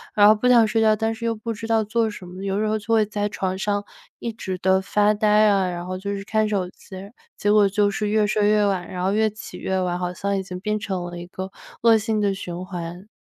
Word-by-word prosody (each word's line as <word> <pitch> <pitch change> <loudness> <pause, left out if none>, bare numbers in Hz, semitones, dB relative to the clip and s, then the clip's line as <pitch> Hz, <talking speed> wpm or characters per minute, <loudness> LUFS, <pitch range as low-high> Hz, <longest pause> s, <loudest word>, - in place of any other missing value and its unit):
然 205 - +6
后 210 - +9
不 220 +3 0
想 240 -2 +6
睡 225 +1 +1
觉， 215 -1 +4
但 225 +1 -1
是 230 +1 -7
又 230 -1 0
不 225 +2 -5
知 225 0 -6
道 225 -1 +2
做 225 +1 0
什 205 -3 -9
么， 180 +1 -9
有 195 0 -1
时 215 - 0
候 215 0 0
就 225 +2 -2
会 220 -1 +4
在 205 0 -2
床 190 -2 -3
上 205 +1 -1 0.4
一 235 - -3
直 190 -4 -5
地 190 +1 +3
发 210 +2 +2
呆 215 0 0 0.2
啊， 195 -2 +2
然 175 0 -5
后 185 0 -4
就 200 +2 -4
是 195 - -6
看 215 +1 +1
手 195 -4 -1
机。 190 - -14 0.4
结 205 - +1
果 210 -1 +5
就 205 +1 +2
是 210 +1 -2
越 210 0 +2
睡 205 0 +1
越 210 0 +4
晚， 190 -3 -1
然 180 -1 -4
后 190 - +2
越 215 +1 +2
起 215 0 -10
越 190 - -2
晚， 180 -1 -1
好 180 0 -2
像 200 +2 -2
已 - - -1
经 185 -1 -7
变 215 +1 -1
成 190 -3 -3
了 175 0 -6
一 175 - -8
个 190 +1 -7 0.3
恶 230 -1 +6
性 215 0 -1
的 200 -1 +1
循 180 -2 -6
环。 175 +1 -7
205 Hz, 290 characters per minute, -23 LUFS, 190-215 Hz, 0.4 s, 后